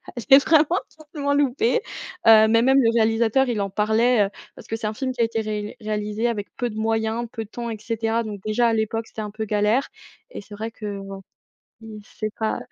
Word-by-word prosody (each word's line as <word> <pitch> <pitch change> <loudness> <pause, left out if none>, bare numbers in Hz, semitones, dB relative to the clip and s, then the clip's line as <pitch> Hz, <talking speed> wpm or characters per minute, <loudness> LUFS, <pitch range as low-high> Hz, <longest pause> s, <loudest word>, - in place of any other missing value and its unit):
elle 240 - -5
est 270 +1 +8
vraiment, 320 +1 +4 0.3
vraiment 285 -2 -1
loupée, 285 - +1 0.5
heu, 220 -1 +8
mais 230 +1 +4
même 265 +1 +4
le 230 - +3
réalisateur, 230 +3 +2
il 215 -4 -1
en 195 - -2
parlait, 220 +2 +2
heu, - - -4 0.3
parce - - -13
que 225 - -3
c'est 220 -1 -4
un 215 - -3
film 260 +3 -3
qui 240 - -3
a - - +5
été 225 0 -1
rél 210 -1 -4
réalisé 210 +2 -2
avec 210 -4 -3
peu 245 -1 -1
de 215 - -9
moyens, 225 +1 -1
peu 225 -1 -5
de - - -22
temps 235 0 -5
et 220 - -5
cetera. 225 +1 -1
Donc 205 -3 -7
déjà 235 +3 +2
à 225 - +1
l'époque, 220 +1 -1
c'était 220 - -7
un 210 -1 -5
peu 220 +1 -4
galère 210 +5 +1 0.4
et - - -8
c'est 205 - -14
vrai 220 +2 -4
que 205 -3 -6
bon, 195 0 -8 0.6
il 215 -1 -10
c'est 215 -1 -5
pas 220 0 -1
225 Hz, 230 wpm, -23 LUFS, 215-235 Hz, 0.6 s, est